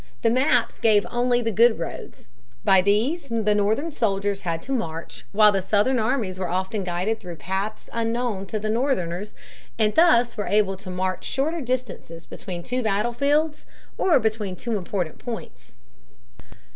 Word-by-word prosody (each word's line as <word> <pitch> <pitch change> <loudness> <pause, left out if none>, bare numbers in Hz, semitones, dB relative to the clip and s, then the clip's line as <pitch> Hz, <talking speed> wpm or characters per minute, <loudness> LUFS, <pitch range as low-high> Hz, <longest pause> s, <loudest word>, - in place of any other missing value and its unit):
The 230 - +4
maps 260 +4 +2
gave 215 -3 +4
only 245 0 +1
the 225 - 0
good 230 +2 +4
roads. 165 -7 -7 0.4
By 190 -1 +5
these 245 - +1
the 220 -2 +1
Northern 215 +10 +1
soldiers 200 -5 -1
had 165 -2 -2
to 270 - -7
march 160 - -4
while 210 0 +6
the 195 -1 0
Southern 210 +7 +2
armies 220 -5 -1
were 185 -2 -2
often 190 +3 -2
guided 185 +5 -1
through 180 -4 -8
paths 190 +5 -4
unknown 230 -3 -1
to 215 - -3
the 215 0 -2
Northerners, 210 -6 -1 0.4
and 215 -2 +2
thus 245 -8 +4
were 205 - -3
able 205 -2 +2
to 190 0 -10
march 185 0 -2
shorter 315 +5 -1
distances 240 - -4
between 175 -2 -7
two 250 +7 -2
battlefields 280 +9 0 0.3
or 345 -7 +3
between 215 -4 -1
two 230 +5 -3
important 180 -4 -3
points. 240 -2 -8
215 Hz, 160 wpm, -24 LUFS, 190-245 Hz, 0.4 s, while